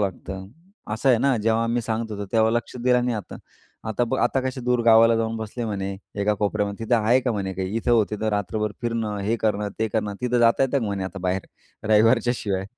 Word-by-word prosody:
लागतं, 95 -1 -4 0.5
असं 110 +5 0
आहे 120 -3 +5
ना? 135 0 +2
जेव्हा 115 +1 +1
मी 120 +1 0
सांगत 110 0 -3
होतो, 100 0 -5
तेव्हा 110 -1 +4
लक्ष 120 +1 -2
दिलं 125 0 +2
नाही, 120 -2 0
आता. 105 - -7 0.5
आता 110 +2 0
बघ, 130 +3 -2
आता 135 - +2
कसे 130 0 -3
दूर 125 0 +1
गावाला 115 0 +6
जाऊन 115 0 -1
बसले" 110 +2 -5
म्हणे, 100 -3 -3 0.3
"एका 105 +1 +2
कोपऱ्यामध्ये. 105 +1 -2
तिथं 120 - +3
आहे 115 +3 +3
का," 125 -1 -1
म्हणे 100 -3 -3
"काही 95 +3 -3
इथं-तिथं, 110 -2 +1
रात्रभर 105 +1 -2
फिरणं, 115 -3 -2
हे 110 +4 0
करणं, 105 -1 0
ते 110 0 0
करणं, 105 -1 -2
तिथं 125 0 +1
जाता 115 +2 +4
येतं 135 +1 +2
का," 120 - -2
म्हणे 100 -2 -2
"आता 95 - -6
बाहेर. 95 +1 -1 0.4
रविवारच्या 115 +3 +4
शिवाय"? 95 -2 -2
110 Hz, 210 wpm, -24 LUFS, 105-120 Hz, 0.5 s, गावाला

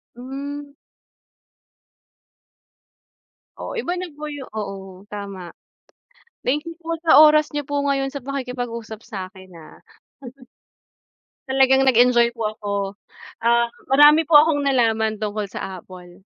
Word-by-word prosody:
Hmm. 280 +3 -7 2.8
Oo - - -6
iba 350 -5 -2
nagoyo 300 -5 -7 0.2
oo 195 -1 -8
tama. 200 -4 -7 0.9
Thank 295 +4 -1
you 335 - -7
po 330 0 -3
sa 305 -2 +7
oras 305 -1 +5
niyo 290 -1 -4
po 285 - -2
ngayon 275 -1 0
sa 270 -2 -8
pakikipag-usap 245 -5 -5
sa 190 -3 -6
'kin, 185 -1 -15
ah. 155 - -15 1.7
Talagang 265 0 +4
nag-enjoy 240 -1 +4
po 230 - -10 0.2
ako, 205 -2 -5 0.7
ah, 235 0 +3 0.2
marami 295 +4 +6
po 320 - -3
akong 295 -1 +5
nalaman 220 -5 +1
tungkol 210 0 -2
sa 190 -1 -7
Apple. 180 +1 -14
250 Hz, 115 wpm, -21 LUFS, 210-290 Hz, 2.8 s, sa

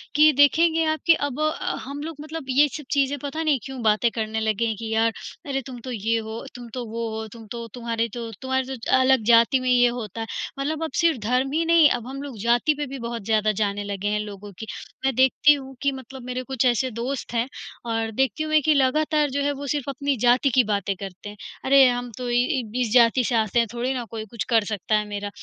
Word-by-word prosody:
कि 305 +1 +7
देखेंगे 320 +3 +4
आप 315 0 0
कि 335 - +7
अब 285 -3 -2
अ, 310 +4 -1
हम 280 +2 -6
लोग 325 +1 -6
मतलब 310 -1 -7
ये 280 +3 +5
सब 300 - -9
चीज़ें 280 0 +1
पता 310 +3 -3
नहीं 300 -4 +2
क्यों 265 -2 -7
बातें 215 +2 +3
करने 220 -1 -2
लगे 220 +1 0
हैं 220 - -1
कि 225 -1 -4
यार 225 +1 +3 0.4
अरे 270 -1 -1
तुम 250 -2 -8
तो 255 - -6
ये 225 0 0
हो, 220 +3 -7
तुम 240 -1 -9
तो 250 -2 -4
वो 230 +1 -3
हो, 220 0 -5
तुम 225 -2 -12
तो 235 -1 -5
तुम्हारे 230 -1 -2
तो 235 -1 -5
तुम्हारे 260 0 -2
तो 230 - -4
अलग 260 -2 +4
जाति 235 +4 +5
में 255 0 -2
ये 245 -1 +5
होता 230 -3 -4
है। 225 - -4 0.3
मतलब 305 +3 -2
अब 320 - -3
सिर्फ 330 -6 +2
धर्म 250 +4 +1
ही 330 +2 +1
नहीं, 330 -2 +6
अब 245 -2 -2
हम 270 +1 -6
लोग 275 -5 -8
जाति 240 +7 +2
पे 295 - -2
भी 270 +1 -7
बहुत 235 -2 -5
ज़्यादा 215 -1 +2
जाने 205 -1 0
लगे 200 0 -4
हैं 210 0 0
लोगों 205 -1 -7
की। 220 - -5 0.4
मैं 270 - +2
देखती 265 +3 +5
हूँ 270 -2 -7
कि 280 - +2
मतलब 265 0 -9
मेरे 250 0 -4
कुछ 260 -1 -1
ऐसे 250 +1 +2
दोस्त 240 +3 -4
हैं 235 +1 0 0.4
और 225 0 -1
देखती 265 +4 0
हूँ 310 - -4
मैं 310 0 +5
कि 310 - +4
लगातार 300 +2 +2
जो 280 +2 -2
है 285 - +1
वो 285 - -5
सिर्फ 285 -1 -2
अपनी 280 +1 -1
जाति 250 +3 +4
की 255 - +6
बातें 200 -2 -1
करते 195 +1 -8
हैं। 210 - -11 0.3
अरे 270 0 +7
हम 245 0 -3
तो 250 -1 -4
इ 240 - 0 0.2
इब 225 -4 -7
इस 245 -3 0
जाति 245 +1 +5
से 235 - 0
आते 220 +1 +2
हैं, 230 - +2
थोड़ी 245 +2 -1
ना 250 -2 -3
कोई 220 -1 -5
कुछ 220 0 -5
कर 225 -3 +4
सकता 210 0 -1
है 210 0 0
मेरा। 205 0 -4
250 Hz, 250 wpm, -24 LUFS, 225-275 Hz, 0.4 s, कि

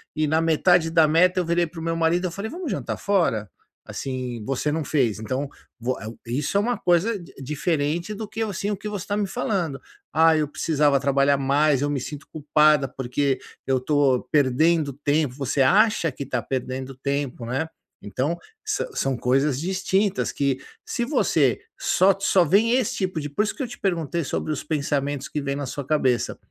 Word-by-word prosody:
e, 155 -1 +1
na 160 +2 +2
metade 165 +1 +3
da 165 -2 +5
meta, 180 +4 +4
eu 180 - 0
virei 170 +1 +2
para 165 0 -10
o - - -6
meu 165 0 -1
marido 165 +2 +1
e 175 - -6
falei: 200 +6 -5
'Vamos 345 -4 -4
jantar - - -3
fora?'". 165 - +1 0.4
Assim, 125 -4 -5
você 135 +4 -1
não 155 -1 -2
fez. 125 -9 +1
Então, 130 +6 -3 0.3
voa 115 -2 -3
isso 135 +10 -1
é - - +5
uma 240 +4 0
coisa 180 +5 +2 0.2
diferente 150 +5 -1
do 215 +1 -6
que, 225 +2 -3
assim, 200 -1 -3
o 205 - -1
que 210 - -7
você 205 -3 -4
está 205 0 -2
me 210 - +1
falando: 175 -8 -2 0.3
"Ah, 160 0 +5
eu 150 - +1
precisava 145 -2 +2
trabalhar 140 0 +3
mais. 140 0 +2
Eu 145 - 0
me 145 -2 -1
sinto 145 +3 -7
culpada, 150 -1 +3
porque 135 +2 -1 0.3
eu 135 -1 +2
estou 135 -1 +2
perdendo 150 +2 +3
tempo". 145 -1 0
Você 135 0 -1
acha 190 +1 +4
que 130 - -11
está 135 - -2
perdendo 130 0 -4
tempo, 140 -2 -3
né. 135 +7 -1 0.3
Então, 130 - -2 0.3
sã 430 +1 -1
são 135 - -1
coisas 135 +2 +1
distintas, 190 +3 0
que 140 -2 0 0.3
se 240 - -2
você 275 +5 +2 0.2
só 195 - +3
só 190 -2 +4
vem 210 +9 +3
esse 255 -4 0
tipo 185 -4 -1
de 145 -1 -6
isso 215 - -1
que 285 - -3
eu 250 - -3
te 240 - -10
perguntei 170 -3 -1
sobre 155 - -3
os 150 - -5
pensamentos 145 -2 -1
que 150 - -3
vêm 140 0 -2
na 145 - -3
sua 140 +2 -5
cabeça. 130 -5 +1
150 Hz, 190 wpm, -24 LUFS, 135-180 Hz, 0.4 s, da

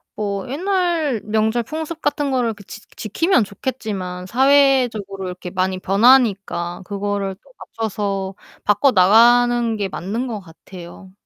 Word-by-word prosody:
뭐 200 -2 -3
옛날 335 - 0
명절 220 +2 0
풍습 315 +4 -6
같은 285 -1 -1
거를 240 -3 0
그 205 -1 -15
지 210 - -11
지키면 255 - +1
좋겠지만 195 -4 -5
사회적으로 250 -6 +2
이렇게 180 0 -7
많이 185 0 -1
변하니까 195 -5 +2
그거를 200 -1 -3
또 - - -21
맞춰서 200 -3 -4 0.3
바꿔 210 +6 +3
나가는 235 +4 +4
게 200 -2 -2
맞는 215 +8 -4
것 220 -3 -4
같아요. 180 +1 -13
215 Hz, 285 characters per minute, -20 LUFS, 195-255 Hz, 0.3 s, 나가는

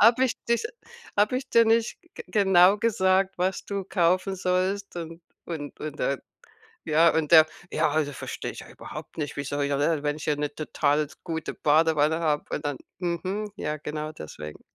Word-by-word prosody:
„Habe 235 +4 +6
ich 250 - 0
dich 235 - +2 0.5
habe 210 +5 +3
ich 260 0 -5
dir 230 0 +6
nicht 225 +1 +2 0.2
g - - -7
genau 190 -2 +5
gesagt, 195 -3 +2
was 185 +2 0
du 200 -2 -3
kaufen 185 +1 +1
sollst?“ 185 +1 -1
Und 165 0 -7 0.2
und 150 -4 -6
und 150 -1 -6
der, 140 -2 -1 0.6
ja 160 +2 +5
und 160 0 0
der: 160 -1 +9 0.3
„Ja, - - +2
also, 155 -2 0
verstehe - - -5
ich - - -9
überhaupt - - -10
nicht, 150 -2 -3
wie 145 - -2
soll 145 +1 -1
hier 140 0 0
ne? 150 +1 +1
Wenn 145 +1 0
ich 155 - -7
hier 150 -1 +1
'ne 150 0 -2
total 150 -1 0
s 145 - -17
gute 160 -2 -4
Badewanne 155 +1 +3
habe 150 -3 0
und - - -5
dann“, 145 -2 -2 0.2
mhm, 185 +4 -2
ja, 150 -6 -3
genau 150 +1 -5
deswegen. 75 - -9
165 Hz, 185 wpm, -26 LUFS, 150-195 Hz, 0.6 s, der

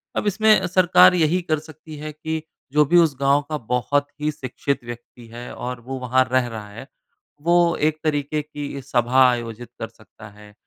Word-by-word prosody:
अब - - -1
इसमें 210 -1 +3
सरकार 185 0 +5
यही 170 +1 +2
कर 155 -3 -1
सकती 155 0 -12
है 155 +1 -6
कि, 160 +1 -4 0.3
जो 150 +1 +4
भी 175 +5 +3
उस 165 -5 +4
गाँव 140 +1 +3
का 155 - -2
बहुत 125 +3 -1
ही 150 +1 0
शिक्षित 135 -1 -4
व्यक्ति 120 0 -11
है 120 +1 -8
और 125 0 -5
वो 130 +2 -6
वहाँ 130 +1 +2
रह 130 -1 +2
रहा 110 -3 -8
है, 115 +6 -11 0.5
वो 170 +1 +3
एक 155 +1 0
तरीके 150 -1 -1
की 145 -2 -7
सभा 130 0 +3
आयोजित 120 -1 -4
कर 115 - -4
सकता 110 -1 -16
है, 105 0 -16
140 Hz, 185 wpm, -22 LUFS, 120-155 Hz, 0.5 s, सरकार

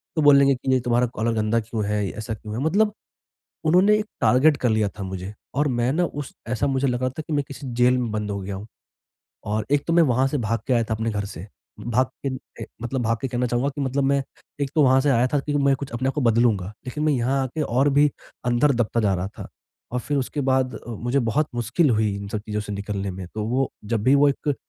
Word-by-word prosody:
तो 160 - +1
बोलेंगे 140 -2 +6
कि 125 - -12
नहीं 130 -1 +3
तुम्हारा 120 +1 +2
कॉलर 115 +2 0
गंदा 110 +1 +1
क्यों 110 -1 -3
है? 105 -1 0
ऐसा 110 +3 -5
क्यों 105 0 -8
है? 130 - -2
मतलब 210 +6 +2 0.7
उन्होंने 185 +6 +5
एक 215 - -2 0.2
टारगेट 140 +4 +4
कर 125 - +2
लिया 110 -2 +2
था - - -3
मुझे 95 +1 -6 0.2
और 145 +1 +2
मैं 120 +2 +2
ना 175 +2 +2
उस 145 -3 -6 0.2
ऐसा 125 +3 0
मुझे 135 0 +1
लगा 125 +1 0
था 130 +5 -6
कि 160 - -3
मैं 145 -1 +1
किसी 140 0 -8
जेल 125 +1 +4
में 120 -3 -2
बंद 105 -1 -2
हो 100 - -3
गया 95 +1 -5
हूँ। 100 - -7 0.8
और 105 0 -1
एक 145 -1 +3
तो 165 - +1
मैं 170 - +6
वहाँ 130 -2 +2
से 145 +2 -1
भाग 115 -1 -1
के 130 - +3
आया 120 -1 +3
था 110 - -2
अपने 110 +1 -2
घर 100 -1 -2
से, 95 -3 -8 0.3
भाग 125 +2 +1 0.2
के - - +1 0.3
अ, - - -6 0.2
मतलब 125 +2 -2
भाग 115 0 +1
के 135 - -1
कहना 125 0 -1
चाहूँगा 120 +3 0
कि 145 - -3
मतलब 135 +1 0
मैं 140 0 +2 0.4
एक 135 - -1
तो 155 - +5
वहाँ 130 0 +5
से 145 - +2
आया 125 -1 +3
था 145 - +3
कि 145 +2 -3
मैं 140 -1 +3
कुछ 135 0 -7
अपने 120 +3 -2
आप - - -3
को 150 - 0
बदलूँगा, 115 -5 +2 0.2
लेकिन 150 +4 -3
मैं 155 -1 +3
यहाँ 135 +2 +1
आके 140 +5 -3
और 135 +1 +2
भी 145 +1 +4 0.4
अंदर 120 +4 +3
दबता 120 -1 0
जा 100 -2 +2
रहा 90 +1 -2
था - - -6 0.4
और 125 - -1
फिर 145 +3 -2
उसके 140 +2 -2
बाद 130 -1 0
मुझे 120 +4 -1
बहुत 135 +5 +1
मुश्किल 120 +7 +1
हुई 110 -3 +2
इन 100 0 -6
सब 105 - -2
चीज़ों 105 0 -2
से 105 0 -6
निकलने 100 -1 -3
में। 95 0 -7
तो 110 - -2
वो 130 +3 +1 0.2
जब 110 -1 -1
भी 130 +4 +5
वो 145 +1 +5
एक 145 +1 -1
125 Hz, 255 wpm, -23 LUFS, 110-140 Hz, 0.8 s, बोलेंगे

